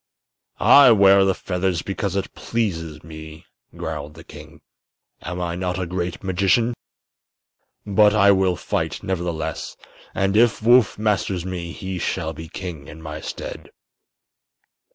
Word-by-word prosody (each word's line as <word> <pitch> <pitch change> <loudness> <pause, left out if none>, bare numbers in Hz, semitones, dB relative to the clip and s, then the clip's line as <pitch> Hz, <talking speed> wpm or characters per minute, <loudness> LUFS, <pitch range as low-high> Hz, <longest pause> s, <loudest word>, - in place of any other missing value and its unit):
"I 140 -2 +8
wear 100 -1 +5
feathers 90 -2 -2
because 100 -1 -3
it 100 - -3
pleases 80 -10 -3
me," 80 0 -11 0.3
growled 75 +2 -5
the 80 - -12
king. - - -13 0.6
"Am 90 +1 -5
I 85 -1 -2
not 90 0 -2
a 90 - -2
great 90 +2 -4
magician? 100 +6 +2 1.1
But 105 +1 +4
I 100 -1 +6
will 95 -2 +2
fight, - - -3
nevertheless, 85 -4 -4 0.4
and 95 +1 +1
if 115 +1 +4
Woof 120 0 +4
masters 100 -4 -1
me 90 -2 -5
he 95 +1 -5
shall 80 -1 -2
be 80 +1 -9
king 85 -7 -7
in 80 - -11
my 80 -1 -7
stead." - - -7
90 Hz, 130 wpm, -22 LUFS, 85-100 Hz, 1.1 s, I